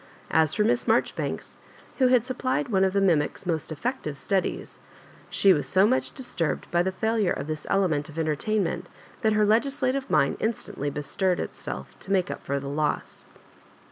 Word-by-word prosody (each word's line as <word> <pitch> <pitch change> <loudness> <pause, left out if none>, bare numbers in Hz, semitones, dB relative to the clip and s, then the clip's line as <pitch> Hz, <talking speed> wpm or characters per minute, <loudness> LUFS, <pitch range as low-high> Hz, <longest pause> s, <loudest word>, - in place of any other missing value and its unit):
As 160 -1 +3
for 210 - +3
Miss 235 +3 +2
Maijoribanks, - - -1 0.4
who 260 - +5
had 250 -2 +4
supplied 255 +1 -1
one 190 -3 +3
of 190 -1 +2
the 200 - +2
mi 190 -3 +5
mic's 150 +4 -2
most 165 -2 -2
effective 155 - -3
studies, 195 +4 -2 0.5
she 195 -1 +5
was 145 -4 -1
so 190 +2 +5
much 255 +4 +1
disturbed 210 - -2
by 175 - +3
the 190 +2 0
feilure 220 0 +1
of - - -4
this 155 0 -5
element 165 -7 +1
of 155 - -11
enter 155 -2 +1
tainment 215 +6 -1 0.4
that 220 -3 +3
her 210 0 +3
legislative 265 +4 +1
mind - - +2
instantly 215 -10 -2
bestirred 175 +6 0
itself - - -6
to 195 - -8
make 185 -2 +2
up - - -7
for 140 0 -1
the 140 - -7
loss. 150 +1 -2
190 Hz, 180 wpm, -26 LUFS, 155-225 Hz, 0.5 s, who